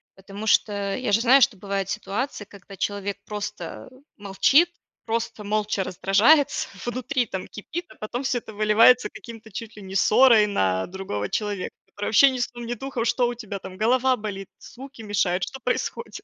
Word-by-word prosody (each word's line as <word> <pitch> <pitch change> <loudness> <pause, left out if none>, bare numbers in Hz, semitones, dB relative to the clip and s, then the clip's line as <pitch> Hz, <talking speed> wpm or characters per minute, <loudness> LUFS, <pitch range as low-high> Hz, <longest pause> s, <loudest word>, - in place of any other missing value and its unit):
Потому 195 +2 -9
что 200 -2 +1
я 255 -5 -2
же 225 +3 +3
знаю, 260 +3 +6
что 245 -5 +3
бывают 195 0 -3
ситуации, 210 +2 -3
когда 195 -1 -14
человек 200 0 -3
просто 210 +3 -6 0.3
молчит, 210 - +3 0.4
просто 230 -1 -3
молча 210 -1 -1
раздражается, 205 - +3 0.2
внутри 250 +1 -1
там 190 -4 -6
кипит, 330 - -7
а - - -15
потом 240 +4 -4
всё 260 -2 0
это 220 -2 -8
выливается 215 +4 +5
каким-то 225 -2 -12
чуть 225 +3 -7
ли 210 - -11
не 190 0 -9
ссорой 220 +1 +6
на 95 - 0
другого 175 - -5
человека, 205 -3 -3
который 205 - -7
вообще 275 +6 +7
ни 260 - -4
сном 240 -1 -4
ни 240 - -2
духом, 245 -1 -4
что 245 +1 +2
у 240 - -2
тебя 215 -4 -7
там: 185 -1 -10
голова 255 +5 +2
болит, 200 -3 -6
звуки 265 -1 -12
мешают, 190 -4 0
что 265 - -9
происходит? 255 - -3
215 Hz, 175 wpm, -24 LUFS, 200-245 Hz, 0.4 s, вообще